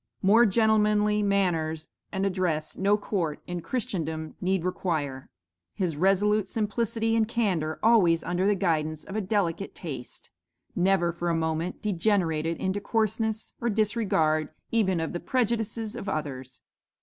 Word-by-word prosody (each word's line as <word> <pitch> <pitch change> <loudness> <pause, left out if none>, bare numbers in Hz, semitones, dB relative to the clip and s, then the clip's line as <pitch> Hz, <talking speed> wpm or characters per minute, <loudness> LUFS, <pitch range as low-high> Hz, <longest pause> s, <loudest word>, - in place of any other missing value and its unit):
More 220 +5 +6
gentlemanly 210 0 +3
manners 170 -6 0 0.2
and 195 -1 -1
address 180 -5 -1
no 200 +2 +2
court 175 -7 -2
in 175 -1 -4
Christendom 160 -9 -3
need 185 -1 0
require; 150 -8 -2 0.5
his 175 -5 -1
resolute 195 +4 +2
simplicity 225 +1 0
and 220 -1 +2
candor, 185 -10 0
always 195 -8 +4
under 180 +2 0
the 205 - +3
guidance 155 -5 -1
of 195 - -8
a 215 - 0
delicate 195 -2 -1
taste, 135 -8 -7 0.4
never 180 -1 +2
for 170 0 -3
a 170 - +1
moment 160 +3 -2
degenerated 170 -5 +1
into 190 +2 -2
coarseness 220 0 -1
or 235 - +1
disregard 205 -8 +1 0.2
even 190 -6 +2
of 160 - -3
the 175 - -2
prejudices 230 -2 -1
of 215 -5 -5
others. 130 -6 -5
190 Hz, 135 wpm, -27 LUFS, 165-210 Hz, 0.5 s, More